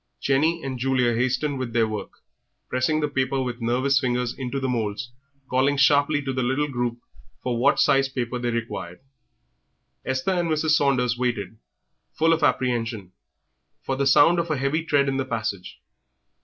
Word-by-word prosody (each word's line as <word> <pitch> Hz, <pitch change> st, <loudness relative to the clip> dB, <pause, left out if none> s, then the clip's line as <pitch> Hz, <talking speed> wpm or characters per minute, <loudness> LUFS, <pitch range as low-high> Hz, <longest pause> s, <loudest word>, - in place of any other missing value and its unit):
Jenny 155 Hz, +5 st, +1 dB
and 130 Hz, -2 st, -4 dB
Julia 125 Hz, -2 st, +1 dB
hastened 130 Hz, +4 st, 0 dB
with 125 Hz, -3 st, -4 dB
their 115 Hz, -1 st, +2 dB
work, 105 Hz, -2 st, -5 dB, 0.6 s
pressing 130 Hz, +5 st, 0 dB
the 150 Hz, -, +1 dB
paper 135 Hz, -1 st, -1 dB
with 125 Hz, -1 st, -5 dB
nervous 130 Hz, +4 st, +2 dB
fingers 125 Hz, -1 st, -1 dB
into 135 Hz, +1 st, -4 dB
the 135 Hz, -, -2 dB
moulds, 115 Hz, -1 st, -3 dB, 0.4 s
calling 135 Hz, +3 st, +1 dB
sharply 145 Hz, +1 st, +3 dB
to 135 Hz, -1 st, -3 dB
the 130 Hz, -, -1 dB
little 135 Hz, +4 st, 0 dB
group 120 Hz, -3 st, -2 dB, 0.5 s
for 120 Hz, -2 st, -1 dB
what 130 Hz, -, +3 dB
sized 135 Hz, 0 st, +3 dB
paper 125 Hz, -1 st, -2 dB
they 120 Hz, 0 st, -1 dB
required. 115 Hz, -7 st, -5 dB, 1.0 s
Esther 130 Hz, +7 st, -1 dB
and 175 Hz, -2 st, 0 dB
Mrs. 155 Hz, 0 st, +1 dB
Saunders 130 Hz, -5 st, +2 dB
waited, 110 Hz, -4 st, -2 dB, 0.5 s
full 165 Hz, +1 st, +3 dB
of 165 Hz, -, -1 dB
apprehension, 115 Hz, -6 st, 0 dB, 0.7 s
for 135 Hz, -, -2 dB
the 140 Hz, +1 st, 0 dB
sound 165 Hz, +5 st, +5 dB
of 170 Hz, 0 st, -2 dB
a 155 Hz, -, 0 dB
heavy 140 Hz, +5 st, 0 dB
tread 145 Hz, -3 st, +2 dB
in 135 Hz, 0 st, 0 dB
the 135 Hz, -, 0 dB
passage. 110 Hz, -6 st, -4 dB
130 Hz, 170 wpm, -24 LUFS, 120-140 Hz, 1.0 s, sound